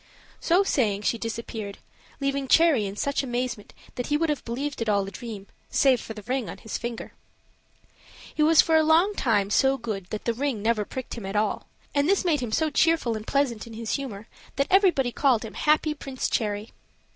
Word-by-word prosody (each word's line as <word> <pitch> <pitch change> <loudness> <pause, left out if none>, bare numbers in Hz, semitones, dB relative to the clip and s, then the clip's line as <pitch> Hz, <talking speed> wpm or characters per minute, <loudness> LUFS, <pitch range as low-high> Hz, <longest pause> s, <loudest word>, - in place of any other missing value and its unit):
So 360 +3 +3
saying, 210 - 0
she 230 - 0
disappeared, 225 -3 -5 0.4
leaving 275 -1 -1
Cherry 290 -8 +4
in 195 - -6
such 280 +6 0
amazement 245 -4 -3 0.2
that 245 - -4
he 295 - +2
would 325 +1 0
have 295 -3 -1
believed 265 +3 -4
it 225 - 0
all 200 -1 +2
a - - -7
dream, 215 -3 -8 0.2
save 260 -4 +3
for 220 - -8
the 210 - -9
ring 255 0 -2
on - - -7
his 220 - -7
finger. 235 -1 -5 1.2
He - - -2
was 315 +1 +6
for 325 - +2
a 315 - +6
long 330 +6 +4
time 210 - +1
so 270 +4 +3
good 215 -7 -5
that 215 - -5
the 235 - +1
ring 250 -4 -2
never 220 -2 +1
pricked 260 +3 -6
him 230 -4 -7
at 195 - -5
all; 210 0 0 0.3
and 285 +3 +2
this 395 -1 +2
made 315 -4 +2
him 245 -3 -4
so 315 +6 +1
cheerful 315 -7 +2
and 215 0 -7
pleasant 250 -6 0
in 230 - -10
his 225 0 -4
humor 230 -6 -5 0.3
that 275 - +1
everybody 360 -10 +4
called 250 -4 +2
him 220 - -8
"Happy 305 0 +2
Prince 270 -3 -4
Cherry." 210 -1 -1
245 Hz, 205 wpm, -26 LUFS, 220-290 Hz, 1.2 s, was